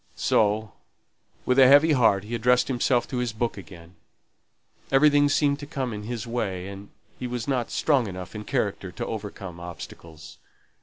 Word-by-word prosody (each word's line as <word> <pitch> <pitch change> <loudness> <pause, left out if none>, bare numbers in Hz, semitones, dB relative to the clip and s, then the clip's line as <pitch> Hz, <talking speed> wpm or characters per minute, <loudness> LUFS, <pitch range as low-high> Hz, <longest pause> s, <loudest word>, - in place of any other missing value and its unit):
So 105 0 +1 0.7
with 125 +1 +3
a 130 - +8
heavy 145 +4 +6
heart 115 -8 +3
he 110 +3 -8
addressed 125 +3 +2
himself 125 -1 +1
to 130 - -3
his 125 -3 -2
book 115 +1 -2
again. 85 -3 -12 1.0
Everything 145 +1 +5
seemed 145 0 +2
to 145 - -8
come 135 -6 -3
in 105 0 -6
his 115 -1 -4
way, 100 -6 -3
and 100 +1 -10 0.3
he 125 - -3
was 120 -2 -4
not 125 -4 -1
strong 135 -7 +1
enough 90 -1 -7
in 105 -1 -6
character - - -2
to - - -5
overcome 90 -3 -7
obstacles. 85 -2 -10
120 Hz, 165 wpm, -25 LUFS, 100-130 Hz, 1.0 s, a